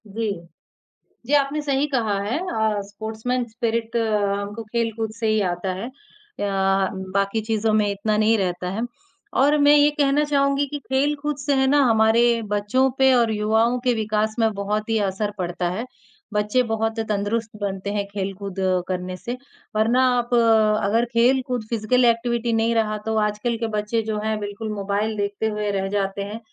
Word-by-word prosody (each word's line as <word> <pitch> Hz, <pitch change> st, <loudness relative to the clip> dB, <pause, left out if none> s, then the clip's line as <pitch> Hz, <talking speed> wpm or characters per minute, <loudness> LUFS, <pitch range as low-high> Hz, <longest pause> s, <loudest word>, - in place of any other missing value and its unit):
जी। 215 Hz, +1 st, -2 dB, 0.9 s
जी, 275 Hz, -, -2 dB
आपने 290 Hz, +1 st, +2 dB
सही 285 Hz, 0 st, 0 dB
कहा 220 Hz, -6 st, +1 dB
है। 210 Hz, +7 st, -1 dB
अ, 220 Hz, -, -1 dB
स्पोर्ट्समैन 220 Hz, +4 st, -3 dB
स्पिरिट 230 Hz, 0 st, -2 dB
हमको 205 Hz, -1 st, -1 dB
खेलकूद 225 Hz, 0 st, -2 dB
से 225 Hz, -, 0 dB
ही 215 Hz, 0 st, +2 dB
आता 185 Hz, +2 st, -3 dB
है 190 Hz, +6 st, -5 dB, 0.5 s
अ, -, -, -4 dB, 0.7 s
बाक़ी 200 Hz, +2 st, +1 dB
चीज़ों 220 Hz, 0 st, 0 dB
में 210 Hz, -1 st, +3 dB
इतना 200 Hz, +2 st, -1 dB
नहीं 220 Hz, +1 st, +3 dB
रहता 180 Hz, -2 st, -2 dB
है 205 Hz, +4 st, -3 dB, 0.6 s
और 290 Hz, +2 st, +4 dB
मैं 290 Hz, +1 st, +6 dB
ये 295 Hz, 0 st, +6 dB
कहना 290 Hz, 0 st, +2 dB
चाहूँगी 280 Hz, -1 st, +2 dB
कि 290 Hz, -, -2 dB
खेलकूद 285 Hz, +2 st, -1 dB
से 285 Hz, 0 st, -1 dB
है 265 Hz, 0 st, +3 dB
ना 290 Hz, +2 st, +4 dB
हमारे 230 Hz, 0 st, +4 dB
बच्चों 210 Hz, +6 st, +2 dB
पे 265 Hz, 0 st, +5 dB
और 235 Hz, -3 st, +3 dB
युवाओं 220 Hz, +3 st, +2 dB
के 250 Hz, -, +4 dB
विकास 215 Hz, -1 st, -1 dB
में 225 Hz, -1 st, +3 dB
बहुत 210 Hz, +2 st, -2 dB
ही 225 Hz, -, +2 dB
असर 205 Hz, +2 st, -2 dB
पड़ता 175 Hz, -1 st, -2 dB
है। 205 Hz, +7 st, -3 dB, 0.5 s
बच्चे 210 Hz, +4 st, +2 dB
बहुत 225 Hz, 0 st, -1 dB
तंदुरुस्त 210 Hz, +2 st, -1 dB
बनते 195 Hz, -1 st, -3 dB
हैं, 205 Hz, -1 st, -1 dB
खेलकूद 195 Hz, -1 st, -5 dB, 0.3 s
करने 185 Hz, 0 st, -3 dB
से। 240 Hz, +5 st, -5 dB, 0.4 s
वरना 230 Hz, +4 st, +3 dB
आप 240 Hz, 0 st, -2 dB
अगर 225 Hz, -1 st, +3 dB
खेलकूद 250 Hz, 0 st, +2 dB
फ़िज़िकल 235 Hz, +2 st, +2 dB
एक्टिविटी 235 Hz, 0 st, +1 dB
नहीं 225 Hz, +1 st, +1 dB
रहा 215 Hz, -1 st, +1 dB
तो 220 Hz, 0 st, -1 dB
आजकल 210 Hz, +2 st, 0 dB
के 230 Hz, 0 st, -2 dB
बच्चे 210 Hz, +2 st, 0 dB
जो 210 Hz, -, -2 dB
हैं 220 Hz, 0 st, 0 dB
बिल्कुल 205 Hz, +1 st, -5 dB
मोबाइल 205 Hz, +2 st, -1 dB
देखते 205 Hz, +1 st, -1 dB
हुए 210 Hz, -1 st, -2 dB
रह 195 Hz, -1 st, -1 dB
जाते 195 Hz, 0 st, -2 dB
हैं। 210 Hz, +3 st, -6 dB
220 Hz, 170 wpm, -23 LUFS, 205-240 Hz, 0.9 s, मैं